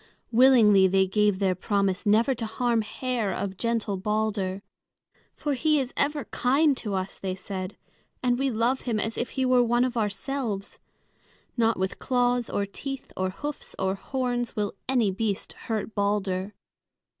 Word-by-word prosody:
Willingly 225 -6 +6
they 190 +1 +3
gave 205 +1 +2
their 190 -1 +2
promise 200 +2 0
never 225 +6 +4
to 230 -2 -4
harm 235 +1 +1
hair 235 -1 -2
of 190 +1 -3
gentle 225 -2 -1
Balder. 205 -1 -1 0.7
"For 295 -1 -1
he 305 +3 +2
is 260 -1 -3
ever 290 0 0
kind 280 +3 +2
to 210 -5 -3
us," 190 0 -4
they 185 -1 -3
said, 190 0 -6 0.5
"and 245 0 +2
we 275 0 +2
love 240 +3 +1
him 230 -4 -1
as 225 +1 -2
if 240 - -2
he 260 - +2
were 255 -1 +5
one 240 +1 +3
of 250 -1 -3
ourselves. 210 0 -2 0.8
Not 230 -2 +2
with 190 0 -2
claws 245 -1 +1
or 200 - 0
teeth 270 +7 -6
or 185 0 0
hoofs 290 +10 -6
or 190 0 0
horns 245 +2 -2
will 210 -2 -1 0.2
any 240 -7 +3
beast 200 0 -2
hurt 220 -1 -4
Balder." 200 -1 -1
220 Hz, 160 wpm, -26 LUFS, 195-250 Hz, 0.8 s, Willingly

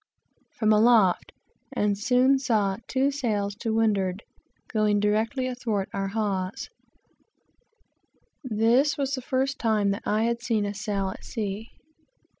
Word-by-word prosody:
from 215 -2 +3
aloft, 215 -4 +4 0.4
and 205 -1 +1
soon 250 +5 +3
saw 215 -7 +1
two 270 +2 +1
sails 215 -8 -1
to 225 +2 -4
windward, 205 -3 +1 0.4
going 215 -2 +1
directly 220 +6 0
athwart 235 -6 -2
our 195 0 -2
hawse. 195 -2 -2 1.7
This 250 +5 +2
was 275 -1 -1
the 260 - -2
first 265 +2 -1
time 215 -3 +2
that 200 - -3
I 215 +1 +1
had 235 0 -1
seen 225 -4 0
a 205 - -3
sail 200 -1 -2
at - - -9
sea. 215 -1 -4
220 Hz, 130 wpm, -26 LUFS, 205-250 Hz, 1.7 s, aloft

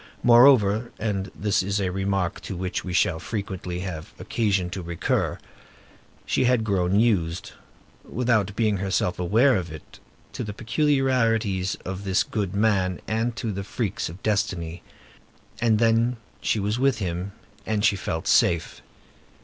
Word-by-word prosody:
Moreover,—and 115 -4 +4
this 105 -1 +1
is 100 +2 -1
a 95 -2 -1
remark 95 -1 -1
to 95 - -6
which 90 +2 -3
we 90 - -5
shall 90 -1 +2
frequently 90 -3 -4
have 85 -5 -6
occasion 100 -6 0
to 95 - -4
recur,—she 85 +8 -4
had 125 -2 +3
grown 100 -2 +1
used, 90 -7 +1 0.5
without 110 -5 0
being 110 -3 +1
herself 90 -2 -1
aware 115 +10 +4
of 90 -4 -3
it, 80 -1 -12 0.3
to - - -4
the 105 - -5
peculiarities 115 -7 +1
of 95 +1 -5
this 95 0 +2
good 100 -4 -3
man 100 -4 +1
and 115 +2 -1
to 115 -1 -3
the 100 0 -4
freaks 100 -2 -3
of 90 +4 -11
destiny. 95 -6 -1 0.8
And 115 -2 +3
then 115 +2 +2 0.2
she 110 - +1
was 105 +4 -1
with 135 -2 +2
him, 90 -1 -3 0.3
and 105 -1 +1
she 100 - +4
felt 80 -3 -4
safe. 85 -2 +2
100 Hz, 140 wpm, -25 LUFS, 90-115 Hz, 0.8 s, Moreover,—and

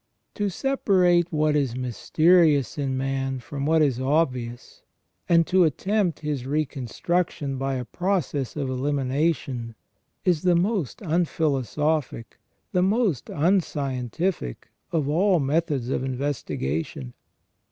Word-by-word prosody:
To 205 -1 -1
separate 180 - +2
what 155 -1 +2
is 135 -5 0
mysterious 150 - +3
in 135 -3 -2
man 135 0 -1
from 140 +3 -5
what 160 0 +4
is 130 -4 +1
obvious, 130 -4 -1 0.5
and 170 -1 +5
to 185 +1 +4
attempt 185 +3 0
his 145 -4 -3
reconstruction 145 +1 -2
by 135 0 -1
a 125 -1 -3
process 175 -6 -2
of 145 -3 -2
elimination, 130 -2 -1 0.5
is 175 -5 +2
the 180 -1 +3
most 180 - -1
unphilosophic, 155 - -1 0.3
the 180 - +2
most 195 - +1
unscientific, 150 - -1 0.2
of 155 -5 0
all 180 +4 +3
methods 145 -3 0
of 130 - -1
investigation. 115 - -3
150 Hz, 110 wpm, -25 LUFS, 130-175 Hz, 0.5 s, and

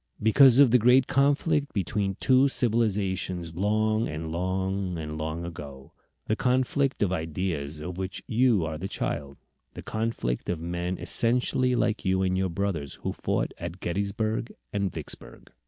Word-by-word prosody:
Because 125 +4 +6
of 140 -4 +7
the 125 - +6
great 125 +3 +5
conflict 145 +2 +1
between 100 0 -1
two 130 +1 +4
civilizations 100 -8 0
long 110 +4 +1
and 80 +1 -5
long 95 +1 -2
and 75 -1 -5
long 80 +2 -4
ago 70 -5 -9 0.3
the 110 - 0
conflict 130 +1 +1
of 95 - +1
ideas 80 -3 -3
of 90 +4 -6
which 95 0 -5
you 115 -6 +2
are 80 -1 -4
the 95 - -3
child; 70 -7 -4 0.4
the - - -8
conflict 110 - -2
of 90 - -1
men 85 +2 -3
essentially 125 +1 +1
like 110 -2 0
you 95 -1 +1
and 95 0 +1
your 95 0 0
brothers 85 -6 -3
who - - -2
fought - - -2
at 85 +2 -6
Gettysburg 100 +6 -2 0.2
and 100 -2 0
Vicksburg. - - -6
95 Hz, 155 wpm, -27 LUFS, 85-115 Hz, 0.4 s, of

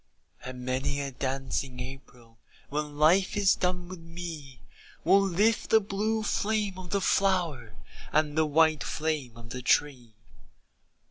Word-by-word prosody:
And 125 0 -7
many 135 +3 -1
a 140 -1 -3
dancing 130 0 -3
April 125 -3 -10 0.3
When 150 0 -3
life 180 +7 +4
is 200 -2 +5
done 180 -1 -1
with 185 -1 -8
me, 165 -5 -8 0.4
Will 195 +4 +5
lift 200 +4 +1
the 220 - +6
blue 215 +2 -1
flame 210 -2 -1
of 180 -1 -9
the 200 +1 0
flower 170 - +1 0.4
And 150 -1 +1
the 160 0 +3
white 155 0 +3
flame 150 -7 -3
of 115 0 -12
the 125 - -5
tree. 125 -4 +1
155 Hz, 140 wpm, -28 LUFS, 130-185 Hz, 0.4 s, the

